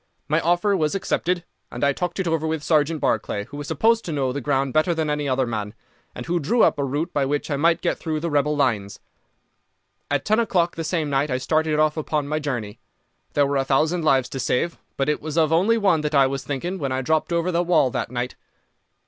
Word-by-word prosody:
My 155 +2 +2
offer 175 +5 +2
was 155 -1 0
accepted, 180 -2 -1 0.3
and 120 - -5
I 140 0 +3
talked 175 +5 -3
it 190 - -1
over 160 -1 0
with 160 -1 -2
Sergeant 155 0 +2
Barclay, 110 -6 -1
who 145 - -10
was 145 0 -6
supposed 225 +9 +2
to 170 - -4
know 135 -4 0
the 140 - -3
ground 135 -1 0
better 160 +2 +2
than 155 -2 -1
any 150 -1 -1
other 130 0 +1
man, 110 -2 -4 0.4
and - - -6
who 175 +1 0
drew 220 - +2
up - - +3
a - - +1
route 145 +6 -2
by 145 - +1
which 145 +3 -2
I - - +1
might 165 +4 +2
get - - -1
through 155 -2 -2
the 170 +1 -3
rebel 145 +1 +2
lines. 115 -8 0 1.1
At 145 -1 -1
ten 215 +2 +3
o'clock 180 -7 +1
the 165 - -3
same 160 -3 -1
night 140 +2 +1
I 125 - 0
started 155 +3 0
off 155 0 +2
upon 150 -2 -1
my 155 +1 -1
journey. 120 -7 -4 0.5
There 145 - +3
were 140 0 0
a 135 - +2
thousand 155 +6 +1
lives 135 -5 +3
to 135 - -5
save, 130 +6 0 0.2
but 135 - 0
it 150 - 0
was 155 +1 -5
of 160 -1 +3
only 200 +8 +3
one 195 -7 +2
that 150 0 -2
I 140 -1 +6
was 135 0 -2
thinking 170 +8 -4
when 140 -3 -2
I 130 0 -1
dropped 160 +5 0
over 170 +1 +1
the 170 0 +1
wall 170 -7 +3
that - - -3
night. 125 0 -3
150 Hz, 240 wpm, -23 LUFS, 135-170 Hz, 1.1 s, I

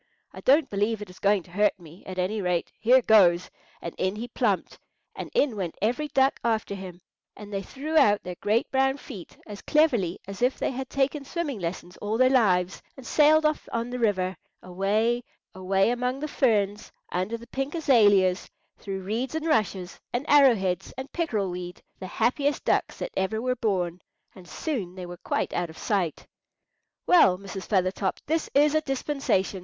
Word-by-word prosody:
I - - -9
don't 285 +2 +4
believe 210 +1 -1
it 190 - -12
is 180 - -16
going 200 -2 +2
to 175 - -19
hurt 205 +1 +1
me; 170 +1 -15
at 185 -1 -7
any 195 +4 -1
rate, 180 -2 -1
here 250 +3 +5
goes," 180 -6 +4 0.3
and 170 - -5
in 190 +2 0
he 230 +3 -5
plumped, - - -1 0.4
and - - -6
in 285 - +2
went 185 -5 -4
every 245 +8 0
duck 270 -1 +2
after 220 -3 0
him, 185 -2 -8 0.4
and 205 0 -10
they 195 - -1
threw 290 +9 -6
out 205 -9 +5
their 180 - -5
great 215 +3 +1
brown 270 +1 +2
feet 210 -11 -11
as 205 -2 -9
cleverly 240 - +2
as 195 +1 -8
if 250 +2 +2
they - - -1
had 265 0 -5
taken 275 +1 0
swimming 290 -5 -4
lessons 175 0 -5
all 210 +2 -2
their 255 +1 +4
lives, 185 -8 +2 0.2
and 265 - -11
sailed 310 +2 +4
off 305 0 0
on 235 +1 -2
the 250 - -4
river, 190 -5 +1 0.3
away, 210 +6 0 0.3
away 190 +3 +1
among 250 +2 -1
the 305 - -3
ferns, 210 -8 0 0.2
under 185 +6 -2
the 235 - -13
pink 270 +5 -4
azaleas, 205 - +3 0.3
through 195 -1 -5
reeds 235 +9 -3
and 320 0 -2
rushes, 200 - 0
and 250 +5 -3
arrow 280 -4 +6
heads 190 -3 -2
and 265 +1 -7
pickerel 220 - -1
weed, 180 0 -7 0.2
the 185 - -6
happiest 265 +9 0
ducks - - +1
that - - -5
ever 190 +3 -1
were 250 +2 -1
born; 185 -7 -1 0.3
and 185 -2 -14
soon 215 - -4
they 185 -1 -7
were 175 0 -8
quite - - -2
out 175 -1 -1
of 160 - -12
sight. 185 -7 -1 0.8
"Well, 330 - +5
Mrs. 195 0 -8
Feathertop, 190 -1 0
this 320 +1 -1
is 295 +1 +5
a 310 - +3
dispensation!" 270 -9 -1
215 Hz, 185 wpm, -26 LUFS, 185-265 Hz, 0.8 s, arrow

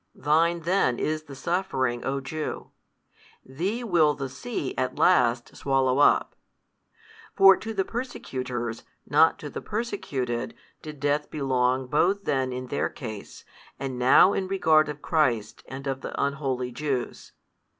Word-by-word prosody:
Thine 165 +4 +2
then 170 -8 +1
is 155 0 -2
the 140 -2 -10
suffering, 135 -8 -1
O 135 +1 -1
Jew: 155 +3 -5 0.7
thee 185 - -3
will 165 -9 +3
the 135 -2 -5
sea 210 - -4
at 130 -1 -2
last 120 0 +3
swallow 135 -1 +1
up. 145 - +4 1.0
For 195 0 +8
to 225 - -6
the 195 -3 -1
persecutors, 125 - -4 0.3
not 155 +4 +4
to 150 - -8
the - - -6
persecuted 145 - -3 0.3
did 150 -2 -9
death 145 +1 0
belong 130 -2 0
both 175 +9 +1
then 130 -5 0
in 125 0 -5
their - - -1
case, 110 -6 -9 0.3
and 130 -2 -4
now 130 +9 +6
in 190 - -2
regard 160 -5 +3
of 150 0 -7
Christ 125 -10 0
and 135 +1 -8
of 135 -1 -3
the - - -6
unholy 135 -3 -1
Jews. 130 -2 -4
140 Hz, 140 wpm, -26 LUFS, 130-165 Hz, 1.0 s, For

